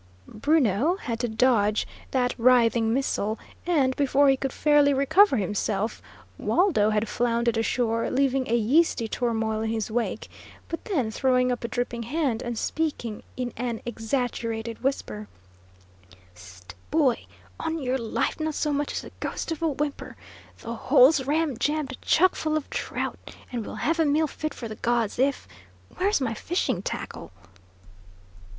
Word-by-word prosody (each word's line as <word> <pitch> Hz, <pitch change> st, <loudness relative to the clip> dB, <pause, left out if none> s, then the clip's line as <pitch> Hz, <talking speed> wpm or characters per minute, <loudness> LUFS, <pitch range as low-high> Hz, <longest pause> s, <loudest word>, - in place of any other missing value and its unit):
Bruno 280 Hz, -, +2 dB
had 235 Hz, -11 st, -4 dB
to 245 Hz, -, 0 dB
dodge 220 Hz, -2 st, +2 dB, 0.2 s
that 250 Hz, -2 st, +1 dB
writhing 235 Hz, -2 st, +4 dB
missile, 225 Hz, -4 st, 0 dB, 0.3 s
and, 275 Hz, -7 st, +2 dB
before 280 Hz, 0 st, +3 dB
he 270 Hz, -, +5 dB
could 270 Hz, 0 st, -3 dB
fairly 290 Hz, -1 st, +4 dB
recover 280 Hz, +4 st, +5 dB
himself, 210 Hz, +1 st, -1 dB, 0.4 s
Waldo 330 Hz, -, +3 dB
had 215 Hz, +1 st, 0 dB
floundered 235 Hz, 0 st, 0 dB
ashore, 230 Hz, 0 st, 0 dB
leaving 270 Hz, -1 st, +1 dB
a 235 Hz, -, +3 dB
yeasty 240 Hz, +1 st, +2 dB
turmoil 220 Hz, -2 st, -1 dB
in 220 Hz, -, -1 dB
his 220 Hz, -1 st, -2 dB
wake, 235 Hz, +1 st, -2 dB, 0.4 s
but 330 Hz, -, -5 dB
then 270 Hz, -, 0 dB
throwing 250 Hz, +1 st, +2 dB
up 245 Hz, -, -3 dB
a -, -, -1 dB
dripping 240 Hz, 0 st, -3 dB
hand, 260 Hz, -1 st, -1 dB
and 240 Hz, -1 st, -4 dB
speaking 265 Hz, -7 st, -2 dB, 0.2 s
in 250 Hz, -2 st, -3 dB
an 235 Hz, -1 st, -3 dB
exaggerated 230 Hz, -1 st, -3 dB
whisper: 105 Hz, -, -2 dB, 1.1 s
"Whist, 90 Hz, 0 st, -13 dB, 0.2 s
boy! 285 Hz, -6 st, +2 dB, 0.3 s
On 320 Hz, 0 st, -2 dB
your 265 Hz, -3 st, -1 dB
life, 230 Hz, +6 st, -1 dB
not 310 Hz, -1 st, -2 dB
so 300 Hz, -1 st, 0 dB
much 290 Hz, 0 st, -1 dB
as -, -, -2 dB
the -, -, -10 dB
ghost -, -, -4 dB
of 325 Hz, -, -4 dB
a 330 Hz, -, +2 dB
whimper! 290 Hz, -1 st, -3 dB, 0.5 s
The 230 Hz, -, -5 dB
hole's 265 Hz, +4 st, +4 dB
ramjammed 295 Hz, -1 st, 0 dB
chuck 370 Hz, +3 st, +4 dB
full 310 Hz, 0 st, -1 dB
of 310 Hz, -, -4 dB
trout, -, -, -3 dB, 0.3 s
and 240 Hz, -3 st, -3 dB
we'll -, -, -7 dB
have 330 Hz, +2 st, 0 dB
a 325 Hz, -, +4 dB
meal 300 Hz, +2 st, +3 dB
fit 310 Hz, 0 st, -5 dB
for 235 Hz, -, -6 dB
the 215 Hz, -1 st, -8 dB
gods 235 Hz, -2 st, 0 dB
if 275 Hz, -, +1 dB, 0.5 s
where's 405 Hz, +3 st, +2 dB
my 245 Hz, -4 st, -1 dB
fishing 345 Hz, +10 st, -1 dB
tackle?" -, -, -6 dB
250 Hz, 155 wpm, -26 LUFS, 225-290 Hz, 1.1 s, he